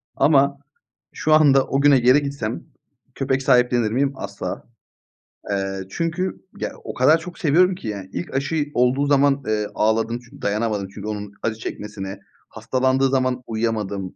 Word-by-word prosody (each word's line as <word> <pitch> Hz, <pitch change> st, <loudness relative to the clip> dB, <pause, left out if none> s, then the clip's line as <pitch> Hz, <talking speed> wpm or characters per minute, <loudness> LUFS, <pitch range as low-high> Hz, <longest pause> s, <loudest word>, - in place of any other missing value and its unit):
Ama 140 Hz, -1 st, +3 dB, 0.6 s
şu 155 Hz, -, +1 dB
anda 140 Hz, -3 st, +5 dB
o 135 Hz, +1 st, 0 dB
güne 140 Hz, -2 st, +6 dB
geri 130 Hz, +4 st, +4 dB
gitsem 140 Hz, -6 st, -4 dB, 0.5 s
köpek 130 Hz, 0 st, -1 dB
sahiplenir 125 Hz, -4 st, +3 dB
miyim? 135 Hz, +3 st, +1 dB
Asla. -, -, -6 dB, 0.9 s
Eee, 95 Hz, -1 st, -2 dB
çünkü 165 Hz, -, -2 dB, 0.2 s
ya -, -, -3 dB
o -, -, -6 dB
kadar 150 Hz, +6 st, +5 dB
çok 180 Hz, +2 st, -10 dB
seviyorum 180 Hz, +4 st, +3 dB
ki 115 Hz, -, -9 dB
yani 100 Hz, -3 st, -5 dB
ilk 90 Hz, -, -5 dB
aşıyı 145 Hz, +2 st, -1 dB
olduğu 125 Hz, +3 st, +2 dB
zaman, 140 Hz, -1 st, +3 dB
eee, 105 Hz, -1 st, 0 dB
ağladım 115 Hz, +2 st, +1 dB
çünkü -, -, -16 dB
dayanamadım 105 Hz, -1 st, -1 dB
çünkü 105 Hz, +1 st, -7 dB
onun 105 Hz, -1 st, -5 dB
acı 110 Hz, -1 st, 0 dB
çekmesine, 100 Hz, -3 st, -6 dB, 0.3 s
hastalandığı 130 Hz, +1 st, +1 dB
zaman 130 Hz, -1 st, 0 dB
uyuyamadım. 105 Hz, -4 st, -2 dB
125 Hz, 150 wpm, -22 LUFS, 110-140 Hz, 0.9 s, güne